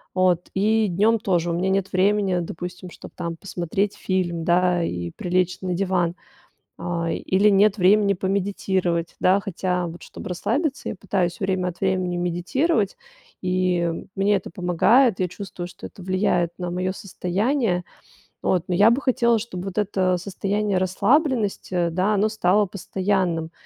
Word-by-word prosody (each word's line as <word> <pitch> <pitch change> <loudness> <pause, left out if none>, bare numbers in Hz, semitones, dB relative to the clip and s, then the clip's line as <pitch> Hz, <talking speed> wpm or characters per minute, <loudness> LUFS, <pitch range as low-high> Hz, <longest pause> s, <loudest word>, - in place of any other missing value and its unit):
От 180 -2 +2
и 215 +2 +2
днём 210 +5 +2
тоже 175 -5 0
у - - -1
меня 180 +3 0
нет 195 0 0
времени, 195 -1 +2
допустим, 180 +2 -6
чтоб, - - -12
там, 170 -1 -4
посмотреть 195 +3 -2
фильм, 175 -3 -1
да, 180 0 +3
и 85 - -3
прилечь 180 - -1
на 185 -1 -2
диван, 180 -2 0 0.6
а, 170 -1 -2
или 200 +3 +2
нет 200 +1 +4
времени 200 +2 +4
помедитировать, 190 -3 -1
да. 190 +2 +4
Хотя, 180 -2 -2
вот, 170 +1 -10
чтобы - - -9
расслабиться, 275 - -1
я - - -4
пытаюсь 185 -3 -1
время 190 -2 0
от 175 0 -8
времени 185 -2 0
медитировать, 185 - 0 0.5
и 180 -2 0
мне 200 +1 +3
это - - -5
помогает. 185 +7 +3
Я 180 - +1
чувствую, 180 -1 -7
что - - -10
это 190 - -12
влияет 180 -2 +1
на 180 -1 -3
моё 185 +1 -1
состояние. 195 +1 -1 0.6
От 180 -2 +1
но 180 - +1
я 205 +5 +6
бы 250 +4 +1
хотела, 235 -4 +2
чтобы 185 -5 -6
вот 195 0 -6
это 190 -3 +1
состояние 200 +2 -1
расслабленности, 195 - +1
да, 185 +5 +1
оно 210 +1 +2
стало 210 -1 +2
постоянным. 185 -3 -1
185 Hz, 150 wpm, -23 LUFS, 175-205 Hz, 0.6 s, я